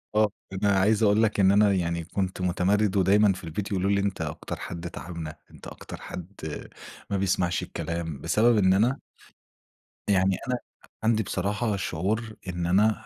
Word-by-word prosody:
آه، 110 0 +4 0.2
أنا 100 +2 +1
عايز 110 +3 +3
أقول 105 +2 +4
لك 105 -2 +1
إن 95 0 +6
أنا 100 0 +5
يعني 85 -2 -1
كنت 95 +2 -3
مُتمرِّد، 95 +3 +2
ودايمًا 100 +2 +5
في 95 - -10
البيت 95 +6 -4
يقولوا 95 +1 +1
لي: 100 - +3
"أنت 100 -3 -2
أكتر 75 -2 -4
حد 85 0 -6
تاعبنا، 85 -3 -7 0.2
أنت - - -12
أكتر - - -9
حد 90 - -7 0.8
ما 100 - 0
بيسمعش 90 -2 +1
الكلام." 80 -2 -4
بسبب 110 +8 +3
إن 95 -2 +4
أنا 120 +8 +2 1.1
يعني 95 -2 +3
أنا 125 - +1
أ 120 - -10 0.3
عندي 110 0 +3
بصراحة 105 +4 -1
شعور 105 +5 -2
إن 90 -1 -2
أنا 105 +5 +2
95 Hz, 165 wpm, -26 LUFS, 90-105 Hz, 1.1 s, إن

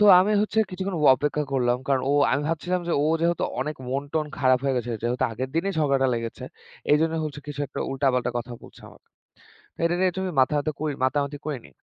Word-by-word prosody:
তো - - +6 0.2
আমি 205 +3 +2
হচ্ছে 215 +1 -1
কিছুক্ষণ 190 0 -3 0.2
অপেক্ষা 150 +2 -1
করলাম। 125 -2 +2
কারণ 135 -2 +2
ও - - +3 0.2
আমি 140 - +1
ভাবছিলাম 175 +3 -1
যে, - - +1
ও - - +2
যেহেতু 170 0 +1 0.2
অনেক 150 +3 -3
মন-টন 145 +3 -2
খারাপ 130 -1 +4
হয়ে 135 -1 +1
গেছে, 120 -1 -2
যেহেতু 120 +2 0
আগের 130 +4 -4
দিনেই 195 +4 0
ঝগড়াটা 140 -3 +2
লেগেছে। 115 -1 -5 0.5
এজন্য 160 +2 +3
হচ্ছে 145 -1 -6
কিছু 145 -1 -5
একটা - - -6
উল্টাপাল্টা 130 -2 +1
কথা 120 +1 -6
বলছে - - -15
আমাকে। - - -19 0.7
তা - - -44
এটা 170 +1 +2
নিয়ে 185 0 +3
একটু 190 - -5 0.2
মাথা 130 +3 +3
ব্যথা 155 +2 -1
করি, 155 -1 -1
মাতা-মাতি 140 +2 0
করিনি। 140 -6 -5
145 Hz, 205 wpm, -25 LUFS, 130-165 Hz, 0.7 s, তো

